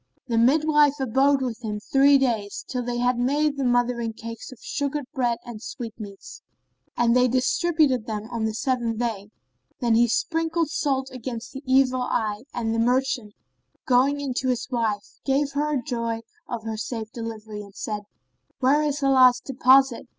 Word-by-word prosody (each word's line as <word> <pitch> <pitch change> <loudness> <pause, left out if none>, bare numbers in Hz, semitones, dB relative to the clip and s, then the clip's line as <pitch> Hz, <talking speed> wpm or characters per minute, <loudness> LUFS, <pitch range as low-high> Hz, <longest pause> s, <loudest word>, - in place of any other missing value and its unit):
The 230 -2 0
midwife 295 +3 +4
abode 270 +2 +2
with 240 -3 -3
them 215 -3 -4
three 275 +5 +4
days, 225 -7 -1
till 250 -1 -3
they 240 0 -3
had 245 0 +1
made 290 +4 +1
the 275 - -2
mothering 245 -2 +1
cakes 230 +3 -8
of 255 - -11
sugared 285 +1 -3
bread 245 -4 0
and 235 -3 -8
sweetmeats; 225 -5 -8 0.6
and 240 0 +3
they 250 0 +5
distributed 260 0 +1
them 215 -1 -4
on 230 -2 -2
the 220 - -1
seventh 235 -2 -1
day. 220 -4 -3 0.5
Then 235 -2 +2
they 235 +1 +5
sprinkled 325 +5 0
salt 270 -4 -1
against 235 -2 -6
the 270 - -7
evil 260 -1 +3
eye 220 -2 -2
and 225 -2 -2
the 225 - 0
merchant, 245 -2 0 0.5
going 270 +3 +3
in 275 -3 -3
to 260 - -1
his 250 -1 -1
wife, 220 -4 -2
gave 275 +1 +1
her 295 +1 0
joy 230 -2 -3 0.3
of 235 -3 -4
her 220 -1 -4
safe 220 0 -5
delivery, 220 -2 -7
and 200 -1 -13
said, 210 -1 -4 0.6
"Where 275 +4 +3
is 295 -1 -1
Allah's 255 -2 +6
deposit?" 265 -1 +3
250 Hz, 165 wpm, -24 LUFS, 230-270 Hz, 0.6 s, Allah's